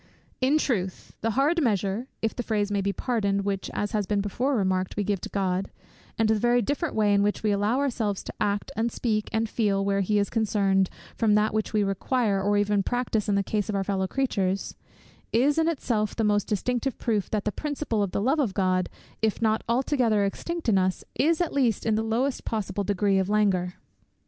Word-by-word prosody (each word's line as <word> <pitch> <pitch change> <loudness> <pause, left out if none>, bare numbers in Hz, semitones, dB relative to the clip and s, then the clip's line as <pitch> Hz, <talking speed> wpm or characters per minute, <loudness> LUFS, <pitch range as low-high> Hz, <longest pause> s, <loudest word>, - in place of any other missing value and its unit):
In 265 +4 +3
truth, 195 - -2
the 225 - 0
hard 310 +5 +3
measure, 210 - 0 0.2
if 225 - 0
the - - -2
phrase 210 -3 -1
may 200 -1 +1
be 200 +1 0
pardoned, 200 -4 -1
which, 195 -1 -2
as 205 - -2
has 210 -3 -1
been 205 0 +1
before 245 +8 0
remarked, 185 -3 0
we 205 - +1
give 200 -2 -1
to - - -6
God; 190 -1 -1 0.5
and 225 - +3
the 220 - +4
very 240 +3 +3
different 290 +6 -1
way 210 -2 +3
in 200 - +4
which 205 +1 0
we 215 - +2
allow 205 +4 +1
ourselves 230 -8 -1
to - - -7
act, 205 +4 0
and 230 +1 0
speak, 215 -3 -1
and 225 0 0
feel, 200 -3 0
where 200 0 +1
he 210 +2 +1
is 200 0 0
concerned, 195 -4 +2 0.3
from 215 -3 +3
that 210 0 +2
which 215 -1 -1
we 215 -1 +2
require, 200 +1 0
or 205 +1 +2
even 205 0 +2
practise 225 -1 -1
in 200 - +2
the 200 - +2
case 210 +1 -2
of 210 - -1
our 195 - 0
fellow 190 -1 -1
creatures, 195 -7 -1 0.6
is 280 +7 +3
in 320 - +2
itself 230 -9 -1
the 225 - 0
most 205 -1 +2
decisive 245 +5 -1
proof 215 -4 -1
that 210 -2 -2
the 210 - +1
principle 290 -5 -2
of 200 - 0
the 200 - -2
love 275 +6 +2
of 230 -10 0
God, 185 -2 +1 0.3
if 220 -2 +1
not 220 -1 +1
altogether 235 -4 +2
extinct 340 +11 -4
in 200 -4 +4
us, 185 0 0
is 320 +3 +2
at 350 - -1
least 245 -7 +1
in 220 - +2
the 215 - +1
lowest 235 +5 -1
possible 205 -2 -2
degree 200 0 +1
of 190 0 -1
languor. 190 -4 +1
210 Hz, 215 wpm, -26 LUFS, 200-235 Hz, 0.6 s, the